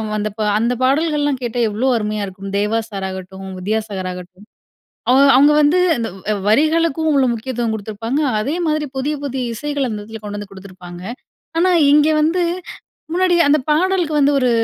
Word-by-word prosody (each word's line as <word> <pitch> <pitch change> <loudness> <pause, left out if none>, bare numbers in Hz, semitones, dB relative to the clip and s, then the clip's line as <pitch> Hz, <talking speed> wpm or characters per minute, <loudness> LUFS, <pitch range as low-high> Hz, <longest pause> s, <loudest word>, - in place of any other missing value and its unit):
வந்தப்போ 215 +1 -3 0.2
அந்த 235 +2 +1
பாடல்கள்லாம் 290 0 +1
கேட்டா 240 0 -3
எவ்வளோ 220 +6 -1
அருமையா 210 -2 -2
இருக்கும். 195 +1 -8
தேவா 210 +2 0
சார் 195 -2 -4
ஆகட்டும், 190 +1 -8
வித்யாசாகர் 200 -2 -3
ஆகட்டும் 180 +3 -12 0.6
அவ - - +5 0.2
அவங்க 290 +3 +6
வந்து 300 +4 +4 0.2
இந்த 230 -3 -3 0.2
வ் 215 - 0
வரிகளுக்கும் 315 +6 +2
உள்ள 270 -2 +4
முக்கியத்துவம் 235 0 -3
கடுத்துருப்பாங்க. 220 +5 -3 0.2
அதே 270 +8 -2
மாதிரி 305 -1 0
புதிய 290 +3 -1
புதிய 265 -2 -3
இசைகள் 285 +3 -2
அந்த 215 - -4
இடத்துல 220 +2 -9
கொண்டு 205 0 -5
வந்து 205 - -7
குடுத்துருப்பாங்க. 185 -2 -11 0.6
ஆனா 365 +2 +3 0.2
இங்க 295 +1 +5
வந்து, 330 +4 +1 0.7
முன்னாடி 360 0 +2
அந்த 300 +1 +4
பாடலுக்கு 350 0 +1
வந்து 285 0 +4
ஒரு 255 -2 +2
235 Hz, 160 wpm, -18 LUFS, 205-295 Hz, 0.7 s, அவங்க